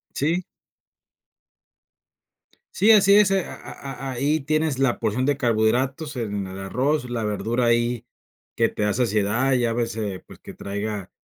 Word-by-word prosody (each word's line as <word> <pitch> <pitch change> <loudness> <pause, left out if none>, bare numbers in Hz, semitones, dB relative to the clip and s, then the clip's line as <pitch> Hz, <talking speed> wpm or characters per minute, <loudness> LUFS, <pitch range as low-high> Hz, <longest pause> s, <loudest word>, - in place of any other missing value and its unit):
Sí. 165 +6 0 2.3
Sí, 205 +4 +3
así 200 -2 +6
es, 210 -2 +5
eh, 195 -1 +1
a - - -8
a 135 - -9 0.2
a - - -3
ahí 145 +5 +1
tienes 155 -1 0
la 135 -3 +2
porción 130 +2 -1
de 145 -1 +2
carbohidratos, 130 +6 0
en 105 -5 -3
el 95 +1 -8
arroz, 125 +8 -1
la 120 -2 -3
verdura 115 +3 -1
ahí 120 0 +1 0.5
que 115 - +4
te - - -6
da 105 0 +1
saciedad, 115 +3 +1
ya 120 -2 +1
ves, 115 -2 -2
eh, 100 -4 -4
pues, - - -14
que - - -11
traiga, 100 -1 -5
120 Hz, 160 wpm, -23 LUFS, 110-140 Hz, 2.3 s, así